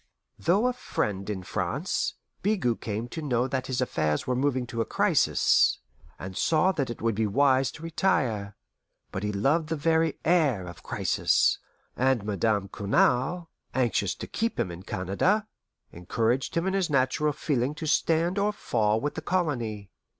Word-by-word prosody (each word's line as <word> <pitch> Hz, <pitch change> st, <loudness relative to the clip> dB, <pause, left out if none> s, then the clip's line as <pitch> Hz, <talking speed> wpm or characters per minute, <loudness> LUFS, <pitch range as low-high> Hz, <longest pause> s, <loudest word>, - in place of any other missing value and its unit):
Through 195 Hz, +7 st, +3 dB
a 250 Hz, -, +2 dB
friend 100 Hz, -, -3 dB
in 95 Hz, -3 st, -3 dB
France, -, -, -2 dB, 0.3 s
Bigot 185 Hz, -, 0 dB
came 110 Hz, +2 st, -3 dB
to 160 Hz, -, -5 dB
know 125 Hz, -4 st, 0 dB
that 130 Hz, 0 st, -2 dB
his 130 Hz, -1 st, -1 dB
affairs 75 Hz, -11 st, 0 dB
were 125 Hz, -, 0 dB
moving 130 Hz, -1 st, 0 dB
to 115 Hz, -1 st, -3 dB
a -, -, +3 dB
crisis, -, -, +3 dB, 0.4 s
and 95 Hz, 0 st, -7 dB
saw 165 Hz, -, +3 dB
that 140 Hz, -8 st, -2 dB
it 120 Hz, -, -6 dB
would 115 Hz, -1 st, +2 dB
be 110 Hz, +1 st, 0 dB
wise 135 Hz, +4 st, +3 dB
to 160 Hz, -, -11 dB
retire; 130 Hz, -, 0 dB, 0.6 s
but 95 Hz, -, -4 dB
he 105 Hz, 0 st, -1 dB
loved 145 Hz, +11 st, +1 dB
the 165 Hz, -, 0 dB
very 160 Hz, +1 st, +1 dB
air 150 Hz, -, +3 dB
of 85 Hz, -3 st, -10 dB
crisis, -, -, +1 dB, 0.4 s
and 130 Hz, -4 st, +2 dB
Madame 105 Hz, -1 st, 0 dB
Cournal, 130 Hz, -, +1 dB, 0.2 s
anxious 120 Hz, -7 st, +1 dB
to -, -, -7 dB
keep 230 Hz, +1 st, -2 dB
him 90 Hz, -, 0 dB
in 85 Hz, +1 st, -8 dB
Canada, 100 Hz, -, 0 dB, 0.5 s
encouraged 115 Hz, -, -1 dB
him 165 Hz, -, +1 dB
in 190 Hz, -, 0 dB
his 195 Hz, -3 st, +1 dB
natural 140 Hz, +2 st, +2 dB
feeling 140 Hz, -1 st, -1 dB
to 160 Hz, -, -6 dB
stand 165 Hz, +4 st, +2 dB
or 205 Hz, +1 st, +2 dB
fall 110 Hz, -, +1 dB
with 145 Hz, +6 st, -2 dB
the 160 Hz, -, -5 dB
colony. 120 Hz, -, -2 dB
130 Hz, 165 wpm, -27 LUFS, 105-160 Hz, 0.6 s, Through